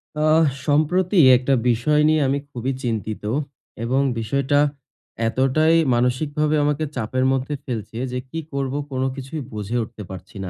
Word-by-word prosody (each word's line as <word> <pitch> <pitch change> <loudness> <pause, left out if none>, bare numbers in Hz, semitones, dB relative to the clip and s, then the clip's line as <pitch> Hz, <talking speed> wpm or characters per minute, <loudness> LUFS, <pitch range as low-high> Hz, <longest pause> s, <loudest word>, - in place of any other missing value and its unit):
আহ! 155 +1 +4 0.2
সম্প্রতি 175 +6 +2 0.2
একটা 130 +2 0 0.2
বিষয় 135 +6 +2
নিয়ে 155 -1 +3
আমি 140 +2 0
খুবই 130 +1 -3
চিন্তিত 110 -3 -3 0.6
এবং 130 +4 +1 0.2
বিষয়টা 140 +5 +1 0.7
এতটাই 135 +7 +2 0.2
মানসিকভাবে 145 +5 +1
আমাকে 145 +1 0
চাপের 130 +2 -1
মধ্যে 135 +2 -1
ফেলছে 115 -3 -5
যে, 125 - -2
"কি 165 - -4
করব? 135 -1 -2 0.2
কোন 130 -1 -2
কিছুই 135 +3 -6
বুঝে 105 +3 -3
উঠতে 110 -1 -9
পারছি 95 +1 -10
না!" 95 - -4
135 Hz, 145 wpm, -22 LUFS, 120-150 Hz, 0.7 s, আহ